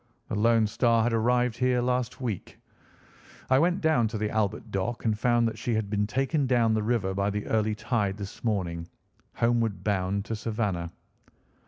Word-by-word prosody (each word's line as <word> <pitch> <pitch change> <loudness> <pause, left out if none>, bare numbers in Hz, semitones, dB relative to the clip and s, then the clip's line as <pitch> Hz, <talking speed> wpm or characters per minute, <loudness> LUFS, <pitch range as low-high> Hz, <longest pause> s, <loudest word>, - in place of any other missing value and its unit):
"The - - -2
Lone 115 +1 +4
Star 115 +1 +2
had 120 0 +1
arrived 120 +1 +2
here 125 -1 +2
last 125 0 -1
week. 115 -8 -5 0.9
I 130 - +6
went 175 +4 +2
down 155 -8 +3
to 110 +1 -4
the 105 0 -2
Albert 110 +1 -1
Dock 110 +6 -2
and 110 -2 +2
found 120 +1 +2
that 110 -1 -5
she 115 0 -1
had 105 -2 -2
been 105 -1 +1
taken 135 +4 0
down 120 -3 +3
the 110 - +1
river 105 -4 0
by 100 +1 0
the 105 0 -3
early 110 -1 +1
tide 105 -3 -1
this 100 -1 -8
morning, 90 -7 -1 0.5
homeward 115 -3 +1
bound 100 0 0
to 115 - -3
Savannah. 105 -6 -2
110 Hz, 180 wpm, -27 LUFS, 105-120 Hz, 0.9 s, I